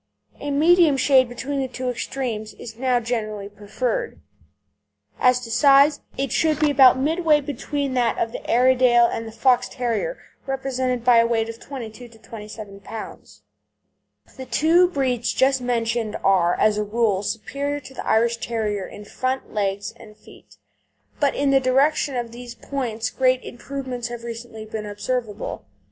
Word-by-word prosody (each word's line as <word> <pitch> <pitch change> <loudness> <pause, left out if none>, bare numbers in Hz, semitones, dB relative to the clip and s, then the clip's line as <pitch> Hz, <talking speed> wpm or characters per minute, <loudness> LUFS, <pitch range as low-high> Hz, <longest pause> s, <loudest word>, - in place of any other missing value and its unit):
A 290 - -5
medium 315 +1 +4
shade 260 -2 +4
between 270 +3 -4
the 265 - -1
two 255 0 -5
extremes 240 -3 -4
is 225 -2 -9
now 250 0 +1
generally 215 -4 -3
preferred. 330 - -3 1.0
As 250 0 +4
to 230 -2 -8
size, 280 +3 +5 0.2
it 275 -3 -2
should 310 -2 +1
be 300 -1 +3
about 265 -3 +7
midway 310 +2 +2
between 285 0 -3
that 240 -3 +1
of 225 - -1
the - - -7
Airedale 250 -1 +5
and 225 -1 -3
the - - -8
Fox 250 +2 +2
terrier, 250 - -2 0.3
represented 260 -2 -2
by 245 -1 +6
a 230 0 +5
weight 225 -1 0
of 230 - -7
from - - -16
22 245 -3 -8
to 230 -1 -18
27 210 -2 -10
lb. 200 - -10 1.0
The 260 -1 -8
two 340 +4 +4
breeds 255 -7 -1
just 265 0 +2
mentioned 230 -2 -1
are, 180 -3 +3
as 210 -1 +3
a - - +1
rule, 210 -2 0
superior 280 +7 -3
to 265 - -12
the - - -6
Irish 230 +1 +2
Terrier 215 -5 -3
in 205 - -11
front 255 +4 -3
legs, 200 +1 -2
and 215 -2 -15
feet, - - -18 0.6
but 285 -2 +2
in 280 -1 +1
the 270 - +5
direction 270 +2 +2
of 240 -2 -3
these 240 0 -9
points 230 -6 -3
great 255 -1 +2
improvements 250 -1 -6
have 240 -1 -7
recently 230 -1 -7
been 215 -1 -6
observable. 210 - -4
245 Hz, 160 wpm, -22 LUFS, 225-270 Hz, 1.0 s, about